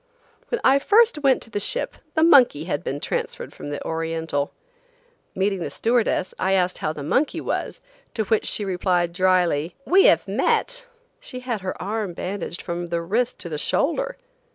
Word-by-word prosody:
When 480 - -1
I 270 +1 +5
first 430 +1 +4
went 275 -3 +3
to 225 - -15
the 205 - -1
ship 480 - -1 0.2
the 315 - +3
monkey 260 - +6
had 160 -4 -3
been 140 - -3
transferred 485 - -4
from - - -8
the 145 - -5
Oriental. 160 -3 -2 0.8
Meeting 195 0 0
the 170 - -3
stewardess 230 -5 0
I 190 +1 +1
asked 180 -1 +1
how 155 - -1
the 150 -2 -7
monkey 260 - +1
was, - - -3 0.3
to 220 - 0
which 220 +1 +1
she 210 - -1
replied 180 -2 0
dryly: 175 -3 +2
"We 385 +2 +5
have - - +4
met." - - 0 0.3
She 255 - -8
had 240 -5 -3
her 185 0 -4
arm 205 -1 -3
bandaged 180 0 -5
from 175 0 -4
the 170 0 -1
wrist 230 +8 0
to - - -6
the 150 -2 -3
shoulder! - - 0
195 Hz, 175 wpm, -23 LUFS, 170-265 Hz, 0.8 s, monkey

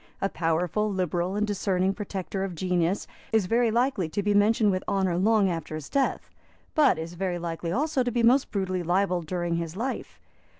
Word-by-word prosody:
A 195 - 0
powerful, 175 +6 0
liberal 180 0 -1
and 210 +1 +1
discerning 195 -2 0
protector 195 -1 -4
of 190 -3 -4
genius 180 +1 0 0.3
is 220 -3 +3
very 230 +4 +2
likely 230 -7 +1
to 200 +5 -2
be 205 +1 +2
mentioned 210 +1 +4
with 185 0 -1
honour 190 -3 +1
long 205 +2 +3
after 165 -3 -3
his 155 -3 -7
death, 275 -1 0 0.5
but 295 - +4
is 165 +2 -5
very 180 0 -2
likely 170 0 -4
also 285 - +1
to 245 -1 0
be 240 0 0
most 255 +4 +4
brutally 185 -3 -1
libelled 180 -1 0
during 175 -1 -1
his 165 0 -4
life. 250 +6 -4
190 Hz, 185 wpm, -27 LUFS, 175-215 Hz, 0.5 s, mentioned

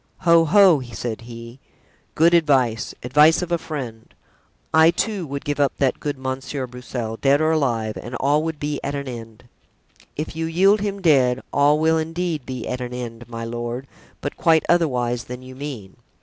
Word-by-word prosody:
"Ho! 170 -2 +5
ho!" 185 -3 +6
said 120 -2 -5
he, 115 +2 -10 0.6
"good 170 +2 +4
advice, 135 -9 +2
advice 150 +7 +4
of 175 - -6
a 170 - +1
friend. 125 -9 -7 0.6
I, 160 +1 +7
too, 185 0 -1
would 140 +2 -6
give 145 -1 -2
up 140 -1 +2
that 135 -2 +1
good 145 -2 -3
Monsieur 130 +1 -4
Broussel, 120 -2 -6
dead 140 +3 +3
or 155 0 +2
alive, 115 -8 0
and 120 +2 -7
all 145 +4 +2
would 160 -1 -4
be 145 -1 -2
at 140 +1 -3
an 140 -1 -4
end." 115 -2 -9 0.7
"If 155 +1 -5
you 160 0 -2
yield 195 +5 +3
him 200 -1 -3
dead, 130 -6 +3
all 145 +2 +4
will 160 +1 +2
indeed 165 -3 -3
be 130 -3 -5
at 125 0 -3
an 125 0 -5
end, 120 -1 -7
my 115 -1 -5
lord, 120 +2 -4 0.4
but 145 - -5
quite 160 -1 +3
otherwise 125 -8 +1
than 125 +1 -8
you 130 0 -10
mean." 130 -9 -8
140 Hz, 180 wpm, -22 LUFS, 125-160 Hz, 0.7 s, I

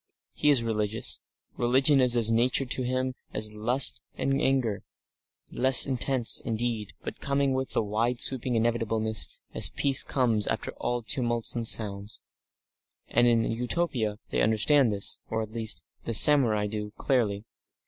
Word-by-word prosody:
He 150 - 0
is 135 -5 +3
religious; 110 -1 -2 0.4
religion 135 +3 +2
is 125 -1 +2
as 115 -1 +3
natural 125 +3 0
to 130 - +1
him 130 +1 -3 0.2
as 105 0 +1
lust 120 +6 +3
and 135 +1 -2
anger, 125 -7 -1 0.7
less 130 0 +6
intense, 130 -1 +2
indeed, 115 -2 -4
but - - -8
coming 140 -1 -1
with 130 0 -5
a - - 0
wide 115 +4 -2
sweeping 130 -2 +1
inevitableness 115 -1 -1 0.3
as - - +3
peace 135 -1 +3
comes 115 -6 -1
after - - -4
all 120 -1 -4
tumults 120 0 -3
and 115 -2 -3
noises. 100 -1 -8 0.9
And 120 +1 +2
in 115 -1 +2
Utopia 120 -3 -1
they - - -2
understand 115 +4 +2
this, 100 -1 -2
or, 110 0 -3
at 110 - -10
least, 110 -1 +2 0.2
the 115 - -3
samurai 115 -7 +5
do, 105 0 -6
clearly. 110 -6 -2
120 Hz, 150 wpm, -26 LUFS, 110-130 Hz, 0.9 s, less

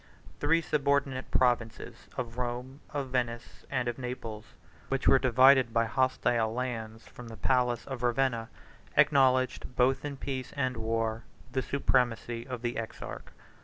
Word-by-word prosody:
Three 165 +3 +3
subordinate 140 -3 0
provinces, 120 -3 0
of 120 -1 -4
Rome, 125 +2 -4
of 140 -3 -3
Venice, 120 -2 -3
and 130 -3 -1
of 120 +1 -3
Naples, 125 -4 -5 0.4
which 135 0 0
were 135 - +7
divided 130 -1 +5
by 115 0 +4
hostile 120 -2 +1
lands 115 -2 -4
from 120 - -11
the 115 -1 -9
palace 125 -2 +1
of 135 -3 -6
Ravenna, 120 -2 +1 0.5
acknowledged, 130 -2 +3
both 130 +1 +2
in 145 -1 -5
peace 130 -2 -5
and 130 -3 0
war, 115 0 -1 0.3
the 130 - 0
supremacy 120 -3 0
of 125 -2 -6
the 120 0 -2
exarch. 60 - -7
125 Hz, 140 wpm, -30 LUFS, 115-130 Hz, 0.5 s, were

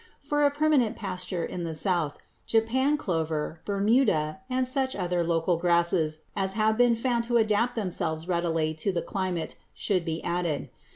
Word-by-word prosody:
For 295 +1 0
a 285 - +6
permanent 290 -5 +2
pasture 180 -3 -3
in 175 - -5
the 165 -1 -4
South, 165 -3 0 0.3
Japan 260 +6 +2
clover, 160 - -2
Bermuda, 200 - +2
and 255 0 +1
such 260 0 0
other 180 -2 0
local 165 +1 +1
grasses 170 -2 +1
as 190 -1 -1
have 220 +1 +2
been 240 0 +4
found 235 0 0
to 240 0 +2
adapt 225 +2 +2
themselves 170 -6 -2
readily 165 -3 0
to 160 +6 -1
the 170 -2 -2
climate 185 -5 -3 0.2
should 185 -4 0
be 165 -1 -3
added. 170 -3 -1
185 Hz, 160 wpm, -27 LUFS, 165-235 Hz, 0.3 s, a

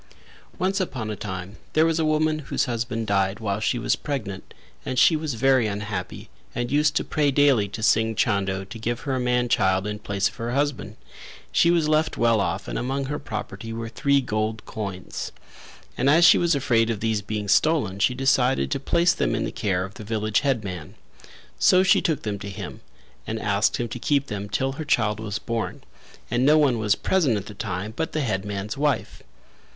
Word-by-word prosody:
Once 190 +2 0
upon 125 - -3
a - - -3
time 95 -1 -6 0.2
there 155 +1 +4
was 165 0 +1
a - - +2
woman 155 0 +1
whose 150 - -1
husband 115 -2 -2
died 100 0 +1
while 100 -2 -2
she 115 +3 0
was - - +1
pregnant, 105 -10 -5 0.3
and 130 - -4
she 160 - +6
was 155 -4 -2
very 130 -1 +3
unhappy 100 -3 -5 0.3
and 120 0 -2
used 145 0 +2
to - - +1
pray 150 -2 +1
daily 140 -7 +4
to 110 +3 -7
Singh 110 +1 +3
Chando 100 -4 0
to 100 +4 -10
give 120 +1 -2
her 135 - -2
a 130 - 0
man 125 0 +1
child 95 -4 +2
in 105 0 -4
place 100 -2 0
of - - -9
her 115 +1 -3
husband; 135 -7 -1 0.6
she 170 - +4
was 170 -3 +3
left 155 +1 +1
well 115 -2 +3
off 95 +1 -2
and - - -3
among 135 +2 -2
her 145 +2 -3
property 110 -2 -6
were 115 0 -5
three 140 +3 +2
gold 110 -2 -2
coins, 100 -4 -5 0.6
and 135 - +2
as 165 +4 +6
she - - +7
was 170 -2 +2
afraid 120 -5 +2
of 115 -3 -1
these 110 -1 0
being 105 0 -4
stolen 105 -3 +2
she 125 +5 +2
decided 135 0 +2
to 140 - 0
place 170 +5 +2
them - - 0
in - - -1
the - - -4
care 95 -3 -1
of 95 - -11
the 110 - -9
village 110 -1 0
headman. 105 - -3 0.6
So 185 0 +5
she 190 - +4
took 160 -7 -1
them 105 -2 -3
to 100 - -6
him 100 -1 -7 0.5
and 110 0 -3
asked 105 0 +1
him 120 - -2
to 125 - -6
keep 140 +2 +1
them 105 -4 -5
till 135 +6 0
her 145 +4 -5
child 110 -8 +1
was 105 -2 -3
born; 115 +1 -4 0.5
and 120 +1 +1
no 150 +3 +6
one 135 -6 +3
was 105 -1 +2
present 155 - +1
at 100 - -5
the 105 - -9
time 100 0 -4
but 160 +3 -3
the 155 - 0
headman's 105 -3 -3
wife. 145 0 -1
115 Hz, 205 wpm, -24 LUFS, 105-140 Hz, 0.6 s, she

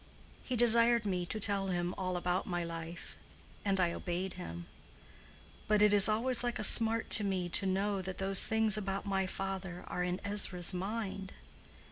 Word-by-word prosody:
He 255 - -4
desired 235 0 +4
me 180 -3 -2
to 215 - -5
tell 200 -1 0
him 175 -1 -2
all 185 -1 -3
about 180 +1 -2
my 175 -1 -3
life, 165 0 -8 0.5
and 195 -1 0
I 175 -2 +1
obeyed 180 +1 -4
him. 85 - -8 1.0
But 210 0 +3
it 210 -1 +4
is 205 +1 +6
always 240 +4 +2
like 240 -1 -2
a - - -4
smart 225 +1 +5
to 215 - +5
me 185 -3 -2
to 195 +3 0
know 195 +1 -1
that 185 0 -7
those 195 0 +5
things 220 -1 +1
about 195 -1 -4
my 195 -1 -1
father 190 -2 -6
are 180 - -5
in 180 +1 -3
Ezra's 200 -3 -1
mind. 195 0 -5
195 Hz, 175 wpm, -32 LUFS, 180-210 Hz, 1.0 s, is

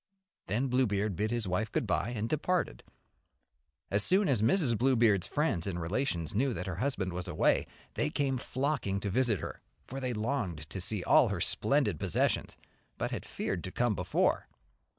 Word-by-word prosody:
Then 120 +8 0
Bluebeard 105 -6 +1
bid 105 +4 0
his 120 -3 -1
wife 100 +4 -1
good - - 0
bye, - - 0
and 115 -2 -2
departed. 155 - -1 1.1
As 100 +1 +3
soon 190 +2 +4
as 125 -7 +2
Mrs. 125 - +3
Bluebeard's 115 -6 +3
friends 145 - 0
and 90 -3 -2
relations 85 - -2
knew 125 +3 +1
that 90 - -4
her 90 -3 -4
husband 100 -6 -1
was 90 +1 -4
away, 90 - +2 0.3
they - - 0
came 135 -3 0
flocking 130 -8 -1
to 100 - -2
visit 115 - +2
her, - - -6 0.2
for 135 - -6
they 130 -2 -2
longed 105 - -2
to 95 - -4
see 95 +1 0
all - - +5
her - - -2
splendid - - +2
possessions, - - 0 0.4
but - - -2
had - - -4
feared 90 - -3
to 95 - -5
come 120 +1 +1
before. 90 -2 +1
110 Hz, 175 wpm, -31 LUFS, 95-130 Hz, 1.1 s, all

